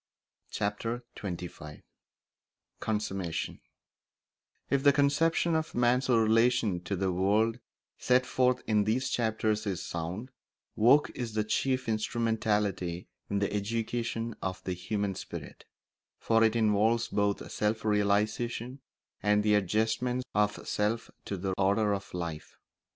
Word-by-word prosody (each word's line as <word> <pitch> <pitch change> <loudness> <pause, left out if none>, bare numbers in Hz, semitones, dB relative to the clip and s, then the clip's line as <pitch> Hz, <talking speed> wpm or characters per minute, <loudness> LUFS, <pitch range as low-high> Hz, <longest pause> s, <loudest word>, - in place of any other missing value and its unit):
Chapter 115 +4 -2
XXV 85 -5 -7 1.0
Consummation 95 -5 -3 1.1
If 140 - +3
the 145 - +7
conception 145 +4 +2
of 160 -1 -1
man's 125 +2 +2
relation 115 -3 +3
to 100 - -1
the 95 0 0
world 105 +6 +2 0.4
set 125 0 +3
forth 125 -1 +1
in 105 -2 +2
these 120 +5 0
chapters 110 -2 0
is 95 -2 -2
sound, 90 +10 -5 0.4
work 130 +7 +5
is 115 -3 -5
the 110 - +2
chief 130 +4 0
instrumentality 105 -5 -1 0.2
in 100 - 0
the 100 0 0
education 115 +2 -2
of 95 -1 -4
the 95 - -2
human 100 +2 -2
spirit; - - -8 0.5
for 115 0 +3
it 110 0 +3
involves 110 +1 +2
both 100 -1 -1
self 110 +1 -1
realisation 110 +5 0 0.4
and 105 0 +3
the 105 0 +3
adjustment 110 +5 +1
of 105 0 0
self 105 +2 -1
to 100 - -3
the 95 +1 -2
order 100 +2 +3
of 100 0 -5
life. 85 -3 -5
110 Hz, 125 wpm, -30 LUFS, 100-120 Hz, 1.1 s, the